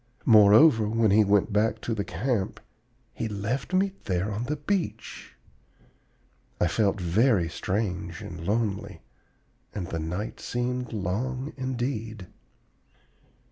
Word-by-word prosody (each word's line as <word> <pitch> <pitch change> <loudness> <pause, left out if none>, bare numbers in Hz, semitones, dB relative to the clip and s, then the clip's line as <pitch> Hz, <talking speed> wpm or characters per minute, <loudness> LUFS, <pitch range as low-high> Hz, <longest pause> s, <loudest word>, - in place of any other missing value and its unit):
Moreover, 110 +2 +6
when 110 -2 +2
he 105 +2 +6
went 100 +1 +2
back 105 +2 +1
to 115 - -2
the 105 -2 -2
camp, 100 +3 -2 0.5
he 115 - -3
left 110 - -3
me 190 +1 +2
there 95 +2 -1
on 105 +4 -3
the 150 +4 -2
beach! 150 - -4 1.2
I - - +3
felt 105 -2 +1
very 95 +1 +2
strange 90 -2 -3
and 85 -1 -8
lonely, 105 +1 -2 0.7
and 95 -4 -3
the 85 -2 -4
night 90 +7 -4
seemed 125 0 -3
long 125 +7 -3
indeed. 120 -5 -3
110 Hz, 120 wpm, -27 LUFS, 95-125 Hz, 1.2 s, Moreover